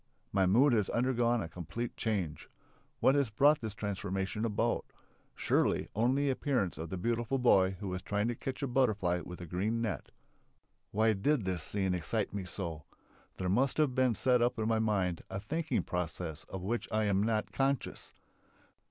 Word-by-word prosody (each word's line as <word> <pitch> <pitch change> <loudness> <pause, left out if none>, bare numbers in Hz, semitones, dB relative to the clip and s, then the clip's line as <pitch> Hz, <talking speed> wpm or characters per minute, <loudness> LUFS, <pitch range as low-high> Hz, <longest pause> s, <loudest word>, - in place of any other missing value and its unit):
My 95 -2 +3
mood 125 +8 +5
has 105 -4 +2
undergone 120 -2 +1
a - - -5
complete 90 +8 -5
change. 95 -9 -2 0.5
What 130 - +5
has 140 -4 +2
brought 145 +8 +4
this 110 -2 -5
transformation 100 +1 -2
about? 115 +2 0 0.5
Surely, - - +1
only 125 +7 +2
the - - +2
appearance 125 - -1
of 80 0 -5
the 95 - -4
beautiful 120 +6 0
boy 95 -7 +4
who 100 -2 -4
was 90 0 -3
trying 105 +2 -1
to - - 0
catch 130 +4 -5
a - - +1
butterfly 105 -9 +1
with 90 - -8
his 85 - -8
green 105 +7 0
net. 115 -2 -3 0.8
Why 110 +2 +3
did 110 +3 +1
this 90 -3 -1
scene 95 +2 0
excite 95 +5 -2
me 100 -2 -3
so? 85 -4 -5 0.5
There 95 - -2
must 125 +8 +2
have 150 -4 +3
been 130 -2 +2
set 125 +2 +3
up 125 +2 +2
in 110 -1 -1
my 115 -1 +2
mind 95 -6 0
a 95 - -4
thinking 160 +10 -1
process 85 -2 -4
of 95 -2 -7
which 115 +5 -2
I 110 0 +1
was 100 -1 +2
not 110 -1 0
conscious. 135 0 -1
110 Hz, 180 wpm, -32 LUFS, 95-120 Hz, 0.8 s, mood